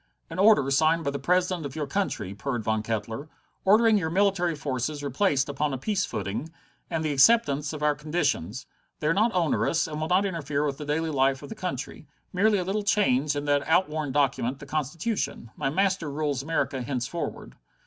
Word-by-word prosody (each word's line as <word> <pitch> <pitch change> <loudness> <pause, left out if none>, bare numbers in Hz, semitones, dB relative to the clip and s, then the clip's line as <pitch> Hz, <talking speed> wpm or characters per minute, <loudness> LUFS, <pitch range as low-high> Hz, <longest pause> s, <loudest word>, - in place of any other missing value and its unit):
"An 165 - -5
order 195 -10 +5
signed 160 +4 +3
by 140 - -1
the 140 - -4
President 180 +3 +1
of 140 -2 -6
your 155 -2 -2
country," 130 - -2
purred 120 +2 -3
Von 110 0 0
Kettler, 115 +6 -4 0.3
"ordering 215 +2 +5
your 160 -3 -2
military 185 -2 +2
forces 145 +1 -3
replaced 140 0 +1
upon 145 0 -1
a - - -4
peace 200 - -1
footing, 105 - -4 0.4
and 165 -2 -2
the 155 - 0
acceptance 145 -3 +4
of 150 -1 -6
our 150 0 +4
conditions. 145 - -2 0.3
They - - -5
are 155 - +3
not 215 +6 +3
onerous, 165 -1 +1
and 155 -1 -5
will 155 - -1
not 185 +3 +3
interfere 150 -6 -1
with 140 -1 -3
the 150 - -5
daily 160 +2 -1
life 135 -1 +1
of - - -9
the - - -5
country. 160 - -5 0.3
Merely 205 +3 +3
a 185 - -1
little 195 +4 -1
change 150 - +2
in 145 0 -3
that 145 -1 +2
outworn 155 -4 +1
document, 135 -2 +1
the 140 - -11
Constitution. 155 - -3
My - - -1
master 190 0 0
rules 145 -2 -1
America 140 -3 -1
henceforward." 125 +6 -4
150 Hz, 190 wpm, -26 LUFS, 135-180 Hz, 0.4 s, order